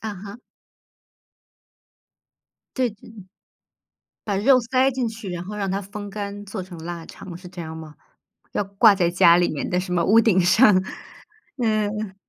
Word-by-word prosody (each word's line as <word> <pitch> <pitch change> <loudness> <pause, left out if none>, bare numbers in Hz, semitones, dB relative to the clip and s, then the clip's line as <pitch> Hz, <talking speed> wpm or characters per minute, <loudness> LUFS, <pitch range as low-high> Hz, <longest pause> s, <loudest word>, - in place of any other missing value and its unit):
啊 220 -2 -5
哈。 200 +4 -10 2.4
对， 255 -2 +1
这 205 0 -17 1.2
把 200 -2 -2
肉 255 +6 +5
塞 255 +3 +2
进 250 -3 -2
去， 220 -3 -8
然 175 -1 -5
后 210 +3 -7
让 195 -2 -2
它 195 +2 -2
风 205 +1 -8
干， 205 0 -6
做 195 -1 -6
成 180 -1 -11
腊 170 -1 -6
肠， 185 -3 -10
是 180 -1 -12
这 175 -1 -8
样 160 -1 -7
吗？ 160 -1 -10 0.6
要 - - 0
挂 200 +2 +4
在 175 -3 +1
家 170 -1 +6
里 175 0 +2
面 145 - -4
的 180 - 0
什 180 0 -3
么 175 -1 +1
屋 225 +3 +6
顶 210 -5 +3
上， 205 +6 +5 0.8
嗯。 215 -4 -1
200 Hz, 175 characters per minute, -23 LUFS, 180-215 Hz, 2.4 s, 家